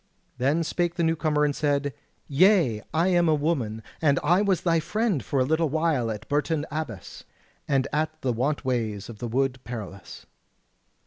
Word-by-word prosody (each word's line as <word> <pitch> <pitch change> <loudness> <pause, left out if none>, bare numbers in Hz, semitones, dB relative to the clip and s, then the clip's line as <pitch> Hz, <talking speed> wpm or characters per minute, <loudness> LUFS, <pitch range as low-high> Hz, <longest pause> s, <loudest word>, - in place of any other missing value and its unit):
Then 145 +6 +2
spake 175 +1 -1
the 170 - 0
new 165 0 +2
comer 150 -2 +1
and 145 -1 0
said: 145 -2 0 0.3
"Yea, 150 - +4
I 165 +4 +2
am 175 -2 +3
a 155 - +4
woman, 130 -8 -1 0.2
and 140 -4 +3
I 175 +6 +4
was 195 -4 +1
thy 165 -2 +2
friend 185 - -1
for 140 - -1
a - - +4
little 160 +2 +1
while 155 -6 +1
at 110 0 -5
Bourton 150 +1 0
Abbas, 140 - -6 0.4
and 135 -1 +1
at 155 +1 -1
the 125 -2 0
want 140 +5 -1
ways 110 -6 -2
of 110 -3 -10
the 120 - -3
Wood 130 +2 0
Perilous." 105 -4 -8
145 Hz, 180 wpm, -26 LUFS, 125-165 Hz, 0.4 s, Yea